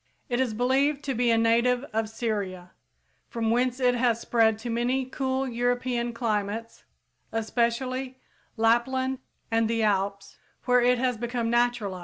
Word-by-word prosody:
It 240 Hz, 0 st, 0 dB
is 245 Hz, -5 st, 0 dB
believed 275 Hz, +5 st, +1 dB
to 275 Hz, -, -2 dB
be 245 Hz, 0 st, +1 dB
a 230 Hz, -, +4 dB
native 235 Hz, +2 st, +3 dB
of 220 Hz, 0 st, -1 dB
Syria, 200 Hz, -6 st, -4 dB, 0.6 s
from 225 Hz, -1 st, -1 dB
whence 250 Hz, +2 st, +1 dB
it 250 Hz, -1 st, +3 dB
has 240 Hz, -2 st, +1 dB
spread 225 Hz, -2 st, +2 dB
to 235 Hz, +2 st, -5 dB
many 250 Hz, +3 st, 0 dB
cool 265 Hz, 0 st, -2 dB
European 245 Hz, 0 st, -1 dB
climates, 225 Hz, -1 st, -3 dB, 0.5 s
especially 250 Hz, +3 st, -1 dB, 0.4 s
Lapland 260 Hz, +3 st, +1 dB, 0.3 s
and 225 Hz, 0 st, +2 dB
the 230 Hz, -1 st, 0 dB
Alps, 200 Hz, -1 st, -1 dB, 0.3 s
where 250 Hz, 0 st, +4 dB
it 250 Hz, +1 st, +3 dB
has 250 Hz, -1 st, 0 dB
become 235 Hz, 0 st, -2 dB
naturalized. 240 Hz, -6 st, +1 dB
240 Hz, 145 wpm, -26 LUFS, 225-250 Hz, 0.6 s, a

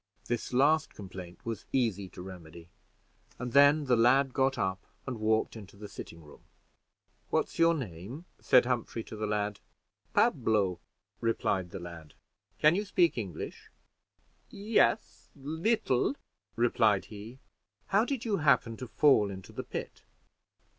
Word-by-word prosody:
This 120 Hz, -1 st, -3 dB
last 150 Hz, +5 st, +3 dB
complaint 90 Hz, -3 st, -10 dB
was 115 Hz, -3 st, -5 dB
easy 105 Hz, -7 st, 0 dB
to 90 Hz, -, -10 dB
remedy, 85 Hz, -2 st, -11 dB, 0.7 s
and 125 Hz, 0 st, -5 dB
then 145 Hz, +2 st, +6 dB
the 125 Hz, -2 st, +3 dB
lad 130 Hz, +3 st, +4 dB
got 135 Hz, -1 st, +1 dB
up, 95 Hz, 0 st, -1 dB, 0.2 s
and 125 Hz, -4 st, -5 dB
walked 110 Hz, +1 st, +1 dB
into 100 Hz, -3 st, -11 dB
the 105 Hz, +1 st, -8 dB
sitting 85 Hz, -4 st, -10 dB
room. 75 Hz, -1 st, -16 dB, 0.9 s
"What's -, -, -1 dB
your 165 Hz, 0 st, +5 dB
name?" 120 Hz, -, -7 dB
said 125 Hz, -, +5 dB
Humphrey 120 Hz, -2 st, -2 dB
to -, -, -9 dB
the 105 Hz, 0 st, -3 dB
lad. 105 Hz, -1 st, -1 dB, 0.6 s
"Pablo," 100 Hz, -5 st, +2 dB, 0.4 s
replied 95 Hz, -5 st, 0 dB
the -, -, -7 dB
lad. 85 Hz, -4 st, -10 dB, 0.4 s
"Can 155 Hz, +6 st, +5 dB
you 200 Hz, +4 st, 0 dB
speak 180 Hz, -4 st, +2 dB
English?" 100 Hz, -9 st, -6 dB, 0.8 s
"Yes, 210 Hz, +1 st, 0 dB
little," 160 Hz, -, 0 dB, 0.4 s
replied 115 Hz, -4 st, +3 dB
he. 110 Hz, +5 st, -9 dB, 0.5 s
"How 200 Hz, +2 st, +4 dB
did 250 Hz, -1 st, -3 dB
you 210 Hz, -3 st, +1 dB
happen 130 Hz, -7 st, +2 dB
to 130 Hz, -, -7 dB
fall 115 Hz, -2 st, +4 dB
into 95 Hz, -1 st, -9 dB
the -, -, -5 dB
pit?" -, -, -6 dB
115 Hz, 140 wpm, -30 LUFS, 100-140 Hz, 0.9 s, then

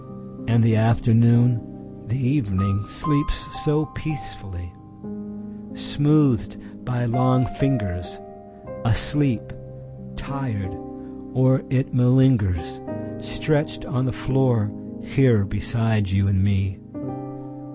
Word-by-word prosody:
……..And 115 Hz, 0 st, +4 dB
the 115 Hz, -1 st, +4 dB
afternoon, 115 Hz, +1 st, +4 dB, 0.5 s
the 115 Hz, +4 st, -1 dB
evening, 105 Hz, -7 st, 0 dB
sleeps 145 Hz, +2 st, 0 dB, 0.3 s
so 150 Hz, +1 st, +1 dB
peacefully! 100 Hz, -, -7 dB, 1.0 s
Smoothed 140 Hz, -9 st, +2 dB, 0.3 s
by 120 Hz, +2 st, -2 dB
long 130 Hz, +2 st, +2 dB
fingers, 100 Hz, -6 st, -2 dB, 0.6 s
Asleep… 130 Hz, +2 st, +1 dB, 0.6 s
tired… 105 Hz, -, -5 dB, 0.6 s
or 130 Hz, +1 st, +3 dB
it 135 Hz, 0 st, 0 dB
malingers, 125 Hz, -2 st, +3 dB, 0.4 s
Stretched 105 Hz, +9 st, -1 dB
on 130 Hz, -3 st, -1 dB
the 125 Hz, -, 0 dB
floor, 125 Hz, -6 st, +1 dB, 0.3 s
here 130 Hz, -, +3 dB
beside 110 Hz, 0 st, -1 dB
you 100 Hz, +1 st, +2 dB
and 95 Hz, -1 st, +2 dB
me. 100 Hz, 0 st, 0 dB
120 Hz, 90 wpm, -23 LUFS, 105-130 Hz, 1.0 s, And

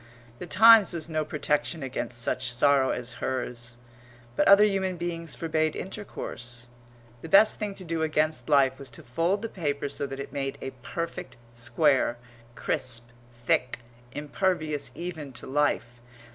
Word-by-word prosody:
The 180 Hz, -, -7 dB
Times 220 Hz, +2 st, +7 dB
was 165 Hz, 0 st, -4 dB
no 155 Hz, 0 st, 0 dB
protection 150 Hz, +1 st, -1 dB
against 125 Hz, -2 st, -4 dB
such 120 Hz, +1 st, 0 dB
sorrow 135 Hz, +2 st, +3 dB
as 120 Hz, 0 st, -3 dB
hers. 125 Hz, -2 st, -4 dB, 0.6 s
But -, -, +2 dB
other 200 Hz, +1 st, +8 dB
human 190 Hz, -3 st, 0 dB
beings 170 Hz, -1 st, -4 dB
forbade 155 Hz, -1 st, 0 dB
intercourse. 120 Hz, -, -7 dB, 0.6 s
The 165 Hz, -, -8 dB
best 215 Hz, +5 st, +6 dB
thing 205 Hz, -2 st, -3 dB
to 185 Hz, -, -7 dB
do 165 Hz, -1 st, -2 dB
against 155 Hz, 0 st, 0 dB
life 135 Hz, -2 st, +4 dB
was 140 Hz, -, -5 dB
to 160 Hz, -, -12 dB
fold 165 Hz, -, 0 dB
the -, -, -1 dB
paper 145 Hz, -8 st, -3 dB
so 140 Hz, 0 st, -3 dB
that 135 Hz, 0 st, -7 dB
it 140 Hz, -, -7 dB
made 135 Hz, 0 st, -3 dB
a 135 Hz, -, -5 dB
perfect 150 Hz, -5 st, -5 dB
square, 120 Hz, +1 st, +2 dB, 0.4 s
crisp, 120 Hz, -2 st, -2 dB, 0.4 s
thick, 125 Hz, 0 st, +1 dB, 0.3 s
impervious 155 Hz, 0 st, -2 dB
even 160 Hz, -6 st, -6 dB
to -, -, -6 dB
life. 130 Hz, -4 st, 0 dB
145 Hz, 150 wpm, -27 LUFS, 130-170 Hz, 0.6 s, other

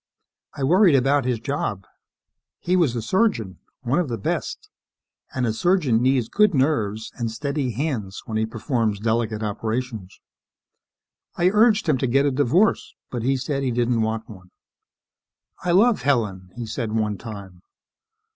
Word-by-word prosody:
I 140 Hz, -, -4 dB
worried 175 Hz, +3 st, +5 dB
about 135 Hz, +1 st, +2 dB
his 125 Hz, -3 st, 0 dB
job. 135 Hz, -, -3 dB, 0.7 s
He 180 Hz, -, 0 dB
was 160 Hz, -9 st, +2 dB
a 115 Hz, -, -3 dB
surgeon 115 Hz, -, 0 dB, 0.2 s
one 130 Hz, +7 st, +1 dB
of 175 Hz, -, 0 dB
the 115 Hz, -, -2 dB
best 100 Hz, -, -3 dB, 0.7 s
and 130 Hz, -1 st, 0 dB
a 110 Hz, -, 0 dB
surgeon 150 Hz, -, +2 dB
needs 130 Hz, -2 st, +2 dB
good 210 Hz, -, +3 dB
nerves 110 Hz, -7 st, 0 dB
and 115 Hz, -1 st, -1 dB
steady 140 Hz, +1 st, -2 dB
hands 115 Hz, -7 st, -3 dB
when 110 Hz, -, -5 dB
he 110 Hz, 0 st, 0 dB
performs 110 Hz, -2 st, -1 dB
delicate 110 Hz, 0 st, -1 dB
operations. 110 Hz, -1 st, -4 dB, 1.2 s
I 175 Hz, +1 st, +3 dB
urged 215 Hz, -1 st, +4 dB
him 145 Hz, -5 st, +2 dB
to 130 Hz, -, 0 dB
get 135 Hz, +4 st, +3 dB
a 145 Hz, -, +2 dB
divorce, 145 Hz, -, +1 dB, 0.2 s
but 120 Hz, -, -3 dB
he 135 Hz, +3 st, +1 dB
said 135 Hz, +2 st, -2 dB
he 135 Hz, -, 0 dB
didn't 120 Hz, -1 st, +1 dB
want 110 Hz, 0 st, -2 dB
one. 95 Hz, -4 st, -13 dB, 1.1 s
"I 180 Hz, -, -2 dB
love 210 Hz, +6 st, +4 dB
Helen," 105 Hz, -9 st, 0 dB
he 120 Hz, -1 st, -5 dB
said 110 Hz, 0 st, -4 dB
one 105 Hz, -2 st, -1 dB
time. 100 Hz, -6 st, -9 dB
125 Hz, 155 wpm, -23 LUFS, 110-145 Hz, 1.2 s, worried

